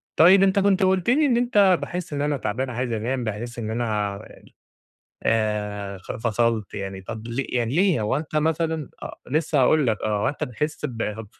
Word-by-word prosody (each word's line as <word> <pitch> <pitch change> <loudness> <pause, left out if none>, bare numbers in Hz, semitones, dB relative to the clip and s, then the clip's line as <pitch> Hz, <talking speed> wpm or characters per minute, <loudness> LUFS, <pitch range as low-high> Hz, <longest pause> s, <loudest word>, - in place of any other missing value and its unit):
طيب 190 +4 +7
أنت 195 +1 +3
كنت 195 -1 +3
قُلت 190 +1 +2
لي 295 +5 +4
إن 245 -4 +3
أنت 205 -7 +4
باحسّ 175 -3 -5
إن 145 - -2
أنا 145 -1 0
تعبان 125 +4 -2
عايز 125 0 -3
أنام، 120 +3 -2
باحسّ 115 +3 -5
إن 110 -2 -4
أنا 105 -3 -1
ال 100 - -13 0.8
آآ، 105 -3 -1
خ - - -7
فصلت 115 -2 0
يعني، 95 -1 -5
طَب 110 +4 -7
لي 120 +3 -2
يعني 120 0 -2
ليه 185 - +3
هو 110 +5 0
أنت 155 +1 -4
مثلًا 160 -1 0
آه، - - -7
لسه 150 -1 +1
هاقول 145 +2 +4
لك 110 -2 0
آه، 105 -1 0
هو - - +2
أنت 140 - -3
بتحسّ 150 +6 -4
ب 110 -2 -4
125 Hz, 195 wpm, -24 LUFS, 110-160 Hz, 0.8 s, طيب